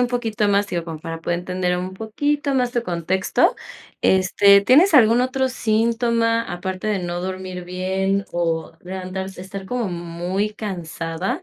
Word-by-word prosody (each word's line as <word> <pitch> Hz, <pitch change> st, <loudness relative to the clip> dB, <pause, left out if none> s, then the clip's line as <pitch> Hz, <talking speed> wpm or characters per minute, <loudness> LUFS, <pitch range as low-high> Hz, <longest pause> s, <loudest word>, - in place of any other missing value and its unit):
un 245 Hz, -, +3 dB
poquito 225 Hz, -4 st, -1 dB
más, 200 Hz, 0 st, +3 dB
digo, 170 Hz, -4 st, -4 dB
para 165 Hz, 0 st, -6 dB
poder 170 Hz, +1 st, -1 dB
entender 180 Hz, 0 st, -1 dB
un 185 Hz, +1 st, -4 dB
poquito 280 Hz, +7 st, -1 dB
más 250 Hz, -2 st, +1 dB
tu 240 Hz, -, 0 dB
contexto, 180 Hz, -1 st, +1 dB, 0.5 s
este, 200 Hz, +1 st, +5 dB
¿tienes 310 Hz, -, +5 dB
algún 235 Hz, -3 st, +6 dB
otro 260 Hz, +1 st, 0 dB
síntoma?, 230 Hz, 0 st, +1 dB
aparte 185 Hz, +3 st, -4 dB
de 210 Hz, -3 st, 0 dB
no 175 Hz, 0 st, -3 dB
dormir 185 Hz, -1 st, -5 dB
bien 190 Hz, +2 st, -1 dB
o 165 Hz, -1 st, -1 dB
levantar 185 Hz, +1 st, -5 dB
estar 190 Hz, +1 st, -8 dB
como 240 Hz, -4 st, -2 dB
muy 175 Hz, +4 st, -3 dB
cansada, 180 Hz, -, -4 dB
190 Hz, 145 wpm, -21 LUFS, 180-230 Hz, 0.5 s, algún